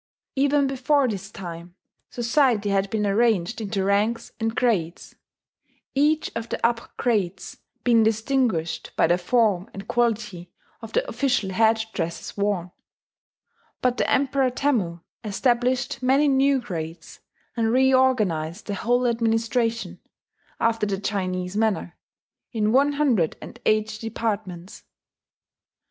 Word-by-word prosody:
Even 280 +1 +3
before 270 +1 +2
this 200 -3 -4
time 175 -3 -9 0.3
society 240 -3 +1
had 195 0 +1
been 210 0 -1
arranged 215 -1 +1
into 200 -2 -2
ranks 210 +4 0
and 225 0 -1
grades, 185 -9 -1 0.8
each 300 +3 +2
of 230 0 -4
the - - -3
upper 235 0 0
grades 195 -6 -1 0.3
being 235 -2 +4
distinguished 220 -6 0
by - - +4
the 175 +1 +2
form 210 0 +1
and 195 0 -8
quality 215 -7 -1 0.3
of - - -9
the - - +1
official 255 - 0
head 220 +3 +3
dresses 170 +1 -4
worn; 200 -4 -1 1.1
but 250 -1 +1
the - - 0
Emperor 270 -1 +2
Temmu 225 - -1 0.2
established 245 +5 0
many 270 +4 +3
new 275 0 +3
grades, 165 -7 -7 0.4
and 225 -1 +1
reorganized 240 -10 +2
the 205 - -3
whole 245 +5 +1
administration, 230 0 0 0.6
after 225 -2 +1
the 195 -1 -1
Chinese 185 -2 -2
manner, 210 -5 0 0.6
in 215 -2 0
one 280 +4 +4
hundred 250 - +1
and 240 - -11
eight 215 0 +1
departments. 205 -5 -4
225 Hz, 125 wpm, -24 LUFS, 195-250 Hz, 1.1 s, being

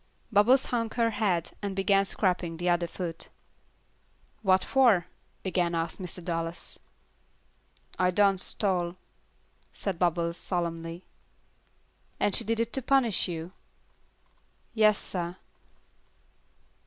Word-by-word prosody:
Bubbles 230 +6 +5
hung 230 -2 -1
her 230 -2 +2
head, 195 -6 0
and 200 -2 -3
began 195 0 +3
scraping 180 -4 -1
the 175 +1 -1
other 175 0 +2
foot. 170 -1 -6 1.1
"What 190 -3 +3
for?" 235 -10 +4 0.4
again 175 -2 0
asked 165 +3 -2
Mr. 180 -1 -7
Dallas. 165 -1 -4 1.2
"I 180 0 +4
done 195 +1 +3
stole," 180 -3 0 0.8
said 190 -4 -4
Bubbles, 170 -1 +1
solemnly. 170 -1 -3 1.2
"And 205 - +2
she - - +4
did 225 +1 -1
it 230 0 -1
to 265 - 0
punish 250 -5 +3
you?" 170 0 -5 1.2
"Yas, 215 -2 +4
sah." 175 -1 -3
185 Hz, 110 wpm, -28 LUFS, 170-210 Hz, 1.2 s, Bubbles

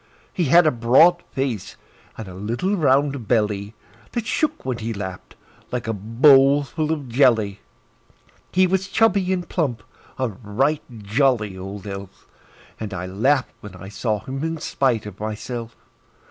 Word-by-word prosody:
He 175 - 0
had 170 +5 +6
a 155 - +4
broad 130 +9 +5
face, 130 -7 -3 0.4
and 110 - -7
a 95 - -9
little 115 - -2
round 140 - +1
belly 105 -2 0 0.4
That 235 -2 -2
shook 310 - -1
when 125 -2 -2
he 115 0 -3
laughed, 95 -2 -7 0.4
like 125 -2 -3
a 115 - 0
bowl 135 +7 +5
full 155 +2 -2
of 145 -4 -3
jelly. 115 -5 +2 0.9
He 185 +1 +4
was 190 +1 0
chubby 200 -3 +2
and 180 -2 -1
plump 130 - -2 0.3
a 130 -2 0
right 120 +9 -1 0.2
jolly 110 -2 +1
old 95 +2 -8
elf; 100 -1 -8 0.5
And 105 -3 -5
I 90 0 -4
laughed 125 +9 +1
when 100 -3 -11
I 95 +1 -10
saw 105 0 -2
him 135 +5 -5
in 165 0 -2
spite 125 -7 0
of 105 -2 -9
myself. 115 +2 -5
120 Hz, 155 wpm, -22 LUFS, 105-145 Hz, 0.9 s, had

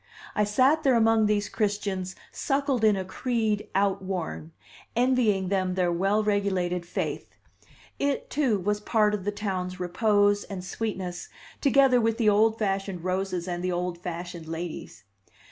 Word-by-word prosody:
I 210 - +2
sat 260 +9 +3
there 270 -5 +3
among 225 -1 +4
these 210 -1 +1
Christians 200 -3 -2 0.2
suckled 275 -4 0
in 215 -2 +5
a 190 -1 -3
creed 220 0 -1
outworn, 190 -4 -1 0.4
envying 235 -6 +2
them 185 -2 0
their 180 -2 +1
well 195 +5 +1
regulated 190 -4 0
faith; - - -4 0.6
it, 280 -1 -1
too, 265 -7 +2
was 205 +3 0
part 210 0 +2
of 200 -3 -3
the 205 - 0
town's 190 -3 -3
repose 205 +2 +2
and 185 -2 -7
sweetness, 185 -3 -4 0.3
together 270 -3 +5
with 225 0 +1
the 225 -3 +4
old 220 +2 +3
fashioned 195 -4 -2
roses 185 -1 -2
and 175 0 -3
the 185 - 0
old 175 0 -2
fashioned 175 -1 -6
ladies. 160 - -6
200 Hz, 145 wpm, -27 LUFS, 180-220 Hz, 0.6 s, in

